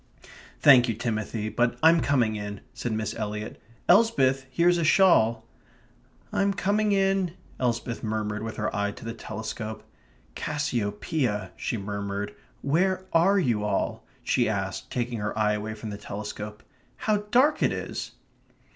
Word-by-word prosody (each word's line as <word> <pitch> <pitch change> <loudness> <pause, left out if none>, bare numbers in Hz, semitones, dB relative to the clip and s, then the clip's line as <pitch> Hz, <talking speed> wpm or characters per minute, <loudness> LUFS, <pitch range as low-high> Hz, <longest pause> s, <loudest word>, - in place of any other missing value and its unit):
"Thank 130 -4 +7
you, 115 - 0
Timothy, 110 -1 -2
but 120 +2 +1
I'm 165 +1 +7
coming 120 -6 +2
in," 105 -1 -5
said 120 - -4
Miss 110 -1 -2
Eliot. 105 -1 -5 0.3
"Elsbeth, 135 - +4
here's 170 +6 +3
a - - +1
shawl." 115 - +4 0.9
"I'm 200 0 +1
coming 205 +2 +1
in," 195 -3 +2 0.3
Elsbeth 120 -1 -1
murmured 105 -1 -2
with 110 0 -5
her 105 -1 -2
eye 105 0 0
to - - -11
the 115 - -4
telescope. 110 0 -6 0.5
"Cassiopeia," 120 -4 -2
she 120 - -3
murmured. 100 0 -4 0.3
"Where 185 +6 +1
are 180 +5 +5
you 120 - +1
all?" 105 -2 -1 0.2
she - - +2
asked, - - -3
taking 120 -2 -2
her 105 +1 -3
eye 105 -1 +3
away 105 +1 -3
from 110 0 -7
the 100 - -6
telescope. 105 +1 -6 0.3
"How 215 -1 +1
dark 265 +7 +4
it - - +3
is!" - - -5
115 Hz, 145 wpm, -26 LUFS, 105-165 Hz, 0.9 s, Thank